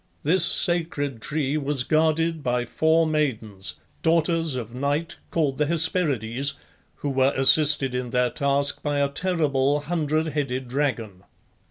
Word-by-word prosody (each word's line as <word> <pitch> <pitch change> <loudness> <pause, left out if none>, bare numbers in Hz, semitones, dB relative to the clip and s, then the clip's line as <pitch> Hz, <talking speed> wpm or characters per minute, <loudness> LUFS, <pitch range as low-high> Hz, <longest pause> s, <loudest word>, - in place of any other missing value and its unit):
This 165 +4 +3
sacred 165 - 0
tree 145 +1 -1
was 140 -3 -1
guarded 160 +2 +1
by 125 -2 -1
four 160 +5 +2
maidens, 110 - -2 0.3
daughters 165 -2 +1
of 115 -2 -6
Night, 145 +5 -2
called 150 -5 -1
the 150 - +2
Hesperides, 140 - 0 0.4
who 145 - -4
were 135 +1 +2
assisted 135 0 +4
in 125 -1 -3
their 125 0 +1
task 140 0 0
by 145 -1 -1
a 140 0 +1
terrible 145 -3 0
hundred 155 0 -1
headed 135 -3 -3
dragon. 120 -8 -3
145 Hz, 135 wpm, -24 LUFS, 130-160 Hz, 0.4 s, assisted